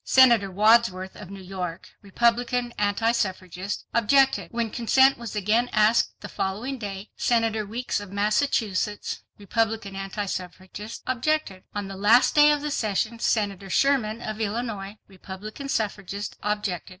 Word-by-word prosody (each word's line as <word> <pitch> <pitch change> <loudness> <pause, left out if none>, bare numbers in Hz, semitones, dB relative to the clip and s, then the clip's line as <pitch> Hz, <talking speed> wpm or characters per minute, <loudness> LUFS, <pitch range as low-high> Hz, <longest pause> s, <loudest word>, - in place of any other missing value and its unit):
Senator 235 -7 +5
Wadsworth, 200 -2 +3
of 205 -3 -10
New 195 -1 -9
York, 180 -2 -6
Republican 235 +3 0
anti 210 +3 +2
suffragist, 190 -3 -3
objected. 270 +4 +3
When 230 -2 -2
consent 265 +3 +4
was 235 -3 -7
again 215 +4 +1
asked, 215 +1 +3
the 205 - -6
following 220 +8 -3
day, 200 -1 -6
Senator 225 -3 +1
Weeks 235 +2 -2
of 205 -2 -9
Massachusetts, 210 -1 0 0.2
Republican 220 -1 -1
anti 195 +1 -4
suffragist, 185 +3 -7
objected. 255 -6 -1
On 205 -1 -3
the 195 - -7
last 220 +6 +5
day 295 0 +7
of 295 -1 0
the 300 - -2
session, 220 0 -1
Senator 200 -4 -1
Sherman 240 -3 +1
of 215 0 -5
Illinois, 210 -2 -3
Republican 205 +7 -9
suffragist, 205 -3 -3
objected. 210 -4 -2
215 Hz, 140 wpm, -25 LUFS, 195-235 Hz, 0.2 s, day